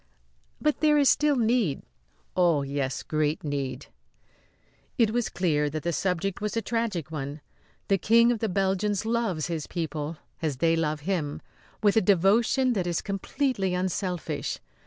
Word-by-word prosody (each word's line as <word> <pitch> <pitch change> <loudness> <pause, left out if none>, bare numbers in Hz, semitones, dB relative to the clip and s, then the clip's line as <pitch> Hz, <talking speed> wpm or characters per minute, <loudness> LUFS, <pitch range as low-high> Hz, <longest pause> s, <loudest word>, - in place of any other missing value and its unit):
"But 300 -1 +1
there 300 -1 +4
is 285 -2 +5
still 295 0 +3
need?" 225 - +1 0.5
"Oh, 170 -6 +3
yes 140 -1 -2
great 155 0 -1
need." 140 -3 -3 1.1
It 225 -4 +3
was 240 0 0
clear 150 -5 +1
that 155 +1 -5
the 170 0 -1
subject 185 +2 -1
was 210 +2 -2
a - - +1
tragic 215 -10 -2
one. 145 -1 -5 0.5
The 195 -1 +2
King 230 +4 +5
of 235 - -1
the 220 - -1
Belgians 195 +2 0
loves 225 -9 0
his 165 -4 -3
people, 160 -2 -4 0.2
as 155 -5 -1
they 165 +4 +3
love 155 -2 -1
him, 155 -4 -2 0.4
with 205 -1 +4
a - - +6
devotion 210 +8 +3
that 185 -5 -1
is 170 -2 0
completely 200 -1 -1
unselfish. 180 -1 -2
185 Hz, 155 wpm, -27 LUFS, 155-220 Hz, 1.1 s, a